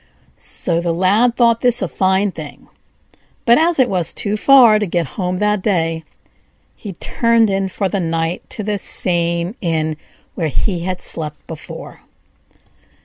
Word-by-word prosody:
'" - - -39
So 170 -1 -2
the 170 -1 -1
Lad 210 +7 +2
thought 235 -2 +3
this 245 -2 +4
a - - -1
fine 190 +6 +1
thing; - - -10 0.8
but 235 +4 +5
as 335 +1 +2
it 260 -2 +4
was 180 -6 -1
too 205 0 -2
far 235 -2 +6
to 210 - -1
get 170 -4 -1
home 180 -2 -2
that 210 0 0
day, 165 -5 0 0.7
he 205 -3 -8
turned 230 +4 +1
in 195 0 -1
for 195 +1 -2
the 200 +1 -2
night 165 0 -2
to 215 - -5
the 205 0 -2
same 170 0 -1
inn 160 -3 -1 0.4
where 165 - -2
he 175 - -1
had 185 -1 -3
slept 150 -2 -3
before. 160 -2 -10
190 Hz, 160 wpm, -18 LUFS, 170-215 Hz, 0.8 s, far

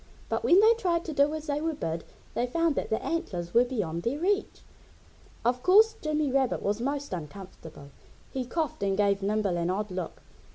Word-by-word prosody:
But - - -1
when 355 - +6
they 445 +2 +7
tried 355 -7 -1
to 315 - -4
do 285 +1 +3
as 310 -1 -6
they 290 0 -1
were 320 -1 -1
bid 165 - -3 0.3
they 245 - 0
found 330 +4 +1
that - - -3
the 220 - -1
antlers 180 - -3
were 235 - +6
beyond 195 -10 -3
their 240 +9 -1
reach. 395 +6 -1 0.8
Of 245 +1 +1
course 435 - +6
Jimmy 305 -2 0
Rabbit 265 -1 +1
was 205 +3 -1
most 280 -2 -2
uncomfortable. 160 -3 -9 0.4
He 260 - -2
coughed 310 0 -3
and 195 -1 0
gave 200 -1 +2
Nimble 200 -2 0
an 170 0 -1
odd 205 +2 -2
look. 180 -2 -5
250 Hz, 195 wpm, -28 LUFS, 195-315 Hz, 0.8 s, they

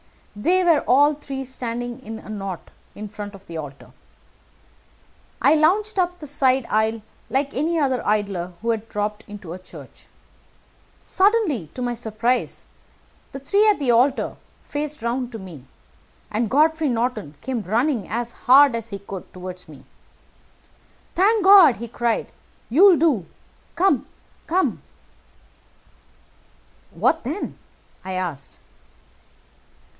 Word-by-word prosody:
They 355 - +2
were 335 -4 +5
all 290 +4 +5
three 275 -2 -6
standing 245 -1 -5
in 225 -2 -7
a - - -12
knot 195 -4 -6 0.2
in 210 +1 -6
front 205 -1 -8
of 195 - -15
the 165 - -7
altar. 145 -3 -9 1.5
I 285 - +5
lounged 385 +7 +2
up 355 0 0
the 310 - -9
side 265 -3 +2
aisle 220 +1 +1 0.3
like 275 +2 0
any 320 +5 0
other 265 -5 +1
idler 200 -4 -1
who 230 +1 0
has 225 -2 -1
dropped 210 0 -3
into 200 -5 -8
a 185 - -8
church. 185 - -14 1.0
Suddenly, 380 - +2
to 250 - -4
my 245 0 -1
surprise, 235 +2 -2 0.7
the 270 - -7
three 405 +10 +2
at 420 - +4
the 275 -4 +1
altar 255 +4 +2 0.3
faced 295 -3 -5
round 245 +1 -2
to - - -5
me, 175 -10 -11 0.7
and 220 +1 0
Godfrey 310 +3 +3
Norton 230 - -2
came 250 -2 -3
running 230 +2 0
as 235 +2 -3
hard 270 +2 +5
as 230 -1 -4
he 200 -2 -6
could 195 -1 -9
toward 185 0 -8
me. - - -13 1.3
"'Thank 410 +3 +3
God!' 380 -9 +8
he 235 +2 -7
cried. 235 0 -1 0.4
'You'll 355 - +7
do. 285 - +2 0.5
Come! 340 -6 +2 0.4
Come!' 365 +3 0 2.1
"'What 325 - +1
then?' 300 +11 -5 0.5
I 190 - -4
asked. 175 -7 -4
245 Hz, 130 wpm, -22 LUFS, 210-300 Hz, 2.1 s, God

